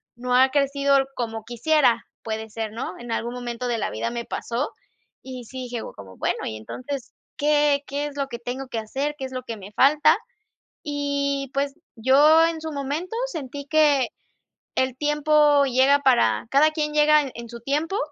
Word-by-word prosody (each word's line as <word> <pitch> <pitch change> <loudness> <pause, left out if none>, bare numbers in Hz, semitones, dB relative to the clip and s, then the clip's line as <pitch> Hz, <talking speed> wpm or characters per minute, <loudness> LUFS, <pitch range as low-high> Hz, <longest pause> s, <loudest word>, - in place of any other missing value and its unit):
no 250 +1 -1
ha 260 +1 +6
crecido 280 0 +2 0.2
como 225 -2 -4
quisiera, 245 +2 +2 0.2
puede 220 0 -4
ser, 220 -1 -4
¿no? 230 +3 -5
En 240 -1 -8
algún 235 +1 -2
momento 245 0 -4
de 240 -1 0
la - - -2
vida 235 - -3
me 235 0 -4
pasó, 245 +5 -3 0.5
y 255 -2 -8
sí, 260 +3 -7
dije, 240 -2 -4
como: 95 -2 -12
"Bueno, - - -2
y, 110 - -4
entonces, 255 - -7 0.2
¿qué 295 -1 +3
qué 285 +1 -2
es 285 - -9
lo 275 -1 -1
que 235 - -6
tengo 250 +3 -5
que 230 - -2
hacer? 275 +7 -3
¿Qué 270 - -4
es 260 - -8
lo 255 -1 -4
que 230 -3 -6
me 200 0 -11
falta?" 285 +6 +5 0.7
Y, 280 -2 -2
pues, 275 0 -1 0.2
yo 290 +7 +6
en 325 -1 -4
su 320 - -5
momento 295 +8 -3
sentí 285 - -6
que 290 -4 +3 0.7
el 260 -1 +1
tiempo 295 -1 +3
llega 265 +2 +4
para 230 - +3
cada 300 +3 +5
quien 300 -1 -2
llega 300 0 +5
en 235 -1 -9
su 235 - -8
tiempo, 305 - -1
275 Hz, 180 wpm, -24 LUFS, 240-295 Hz, 0.7 s, ha